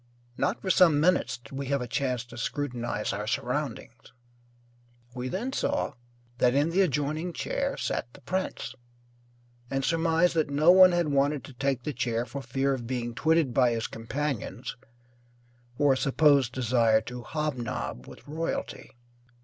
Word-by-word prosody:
Not 200 Hz, -, 0 dB
for 190 Hz, -, 0 dB
some 170 Hz, -5 st, +5 dB
minutes 180 Hz, +4 st, +2 dB
did 120 Hz, -2 st, -17 dB
we 135 Hz, 0 st, -4 dB
have 140 Hz, +1 st, +1 dB
a -, -, -6 dB
chance 125 Hz, -1 st, -1 dB
to 120 Hz, -, -13 dB
scrutinize 120 Hz, -4 st, -3 dB
our 105 Hz, +2 st, -4 dB
surroundings. 120 Hz, -2 st, -3 dB, 1.0 s
We 125 Hz, 0 st, -4 dB
then 235 Hz, -, -3 dB
saw 290 Hz, +1 st, -1 dB, 0.5 s
that 125 Hz, +1 st, +3 dB
in 145 Hz, +4 st, +2 dB
the 190 Hz, +3 st, +3 dB
adjoining 155 Hz, +1 st, 0 dB
chair -, -, -2 dB
sat 120 Hz, -, -3 dB
the -, -, -15 dB
prince, 185 Hz, +8 st, -3 dB, 1.0 s
and 135 Hz, 0 st, -1 dB
surmised 165 Hz, +2 st, +2 dB
that 160 Hz, -3 st, +1 dB
no 150 Hz, +4 st, +5 dB
one 185 Hz, 0 st, +8 dB
had 175 Hz, -3 st, +1 dB
wanted 140 Hz, 0 st, +1 dB
to 140 Hz, -, -11 dB
take 135 Hz, 0 st, -1 dB
the 150 Hz, -, -3 dB
chair 120 Hz, -1 st, -1 dB
for 140 Hz, +2 st, -6 dB
fear 135 Hz, +1 st, 0 dB
of 120 Hz, -3 st, -5 dB
being 120 Hz, -2 st, -3 dB
twitted 155 Hz, 0 st, +2 dB
by 125 Hz, -1 st, +4 dB
his 115 Hz, 0 st, -2 dB
companions 125 Hz, -1 st, -4 dB, 1.0 s
for 145 Hz, -2 st, +4 dB
a -, -, -1 dB
supposed 140 Hz, -2 st, +3 dB
desire 115 Hz, -3 st, +3 dB
to 125 Hz, +2 st, -7 dB
hobnob 125 Hz, -, -4 dB
with -, -, -13 dB
royalty. 160 Hz, -3 st, -4 dB
140 Hz, 155 wpm, -28 LUFS, 120-155 Hz, 1.0 s, one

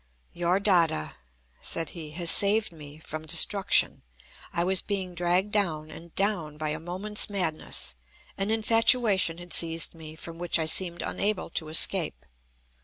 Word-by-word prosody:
"Your 175 Hz, +2 st, +1 dB
Dada," 175 Hz, -, +2 dB, 0.5 s
said 165 Hz, -2 st, -2 dB
he, 160 Hz, -3 st, -7 dB
"has 170 Hz, -2 st, +4 dB
saved 210 Hz, +1 st, +3 dB
me 150 Hz, -2 st, -11 dB
from 155 Hz, 0 st, -8 dB
destruction. 190 Hz, +5 st, +2 dB, 0.5 s
I 170 Hz, 0 st, -1 dB
was 190 Hz, +1 st, +2 dB
being 190 Hz, -3 st, -4 dB
dragged 175 Hz, +4 st, 0 dB
down 160 Hz, -7 st, -1 dB
and 165 Hz, +1 st, -13 dB
down 180 Hz, -7 st, -1 dB
by 155 Hz, 0 st, -3 dB
a 155 Hz, +1 st, -3 dB
moments 190 Hz, +7 st, -1 dB
madness. 160 Hz, -, -2 dB, 0.4 s
An 195 Hz, +1 st, -3 dB
infatuation 225 Hz, -5 st, +2 dB
had 175 Hz, -1 st, -8 dB
seized 165 Hz, -1 st, +3 dB
me, 160 Hz, -2 st, -10 dB
from 165 Hz, +1 st, -10 dB
which 175 Hz, 0 st, +1 dB
I 160 Hz, -, -1 dB
seemed 170 Hz, +1 st, +3 dB
unable 200 Hz, -4 st, -2 dB
to 160 Hz, -, -4 dB
escape. 165 Hz, +1 st, +3 dB
175 Hz, 150 wpm, -26 LUFS, 160-200 Hz, 0.5 s, has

